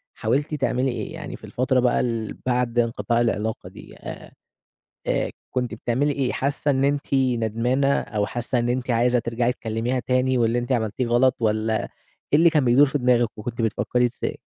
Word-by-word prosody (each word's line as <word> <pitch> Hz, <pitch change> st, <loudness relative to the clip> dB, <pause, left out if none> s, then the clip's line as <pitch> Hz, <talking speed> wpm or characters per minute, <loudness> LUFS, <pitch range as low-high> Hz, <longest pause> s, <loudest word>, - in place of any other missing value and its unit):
حاولتِ 140 Hz, +8 st, -1 dB
تعملي 130 Hz, -2 st, 0 dB
إيه؟ 115 Hz, -3 st, -5 dB
يعني -, -, -7 dB
في -, -, -29 dB
الفترة 130 Hz, +1 st, 0 dB
بقى 125 Hz, 0 st, +2 dB
ال 115 Hz, -3 st, -2 dB
بعد 125 Hz, -1 st, +1 dB
انقطاع 115 Hz, 0 st, +1 dB
العلاقة 110 Hz, -1 st, -1 dB
دي -, -, -13 dB
آآ، -, -, -9 dB, 0.8 s
آآ، -, -, 0 dB, 0.2 s
كنتِ 125 Hz, -2 st, -2 dB
بتعملي 125 Hz, +6 st, 0 dB
إيه، 135 Hz, -2 st, -1 dB
حاسة 145 Hz, +2 st, 0 dB
إن 135 Hz, 0 st, +1 dB
أنتِ 140 Hz, 0 st, 0 dB
ندمانة 125 Hz, +1 st, +1 dB
أو 105 Hz, -3 st, -2 dB
حاسة 120 Hz, +3 st, -2 dB
إن 120 Hz, 0 st, 0 dB
أنتِ 125 Hz, +1 st, -2 dB
عايزة 120 Hz, +1 st, +3 dB
ترجعي 120 Hz, +1 st, 0 dB
تكلميها 115 Hz, +2 st, -2 dB
تاني 130 Hz, +1 st, +1 dB
واللي 115 Hz, 0 st, +2 dB
أنتِ 120 Hz, +2 st, -5 dB
عملتيه 120 Hz, 0 st, 0 dB
غلط، 120 Hz, +2 st, +3 dB
والّا 110 Hz, 0 st, 0 dB, 0.5 s
إيه 145 Hz, -, +6 dB
اللي 170 Hz, +1 st, +6 dB
كان 150 Hz, -5 st, +2 dB
بيدور 125 Hz, +4 st, +6 dB
في 145 Hz, +1 st, -1 dB
دماغِك 125 Hz, -3 st, +3 dB
وكنتِ 115 Hz, +2 st, -4 dB
بتفكري 120 Hz, +2 st, +1 dB
إزاي؟ 120 Hz, 0 st, -3 dB
125 Hz, 180 wpm, -23 LUFS, 115-130 Hz, 0.8 s, إيه